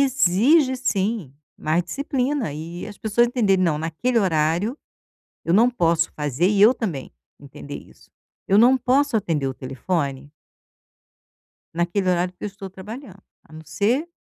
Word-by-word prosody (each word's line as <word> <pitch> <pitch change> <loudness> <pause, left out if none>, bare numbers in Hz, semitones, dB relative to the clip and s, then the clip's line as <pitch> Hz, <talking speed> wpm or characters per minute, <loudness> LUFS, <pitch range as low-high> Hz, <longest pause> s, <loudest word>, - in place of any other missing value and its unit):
exige 260 - +3
sim 200 - -2 0.2
mais 160 +3 0
disciplina 270 - -2
e 165 +4 -7
as 205 -2 -11
pessoas 220 +2 +2
entenderem: 205 -7 +2
"Não, 155 -3 +1
naquele 165 +10 -1
horário 175 - +1 0.7
eu 165 - 0
não 230 +5 +5
posso 165 -8 +1
fazer", 150 +3 0
e 200 0 +2
eu 225 +5 +7
também 170 - -5 0.3
entender 140 0 -10
isso: - - -14 0.4
"Eu 195 - +4
não 245 +4 +6
posso 260 0 +2
atender 165 -9 -1
o 130 - -3
telefone" 140 +1 -3 1.4
"naquele 180 +3 0
horário 180 +1 0
que - - -14
eu - - -1
estou 195 -1 -9
trabalhando. 195 +2 -10 0.2
A - - -20
não 155 - -9
ser" 235 - 0
195 Hz, 150 wpm, -22 LUFS, 165-240 Hz, 1.4 s, eu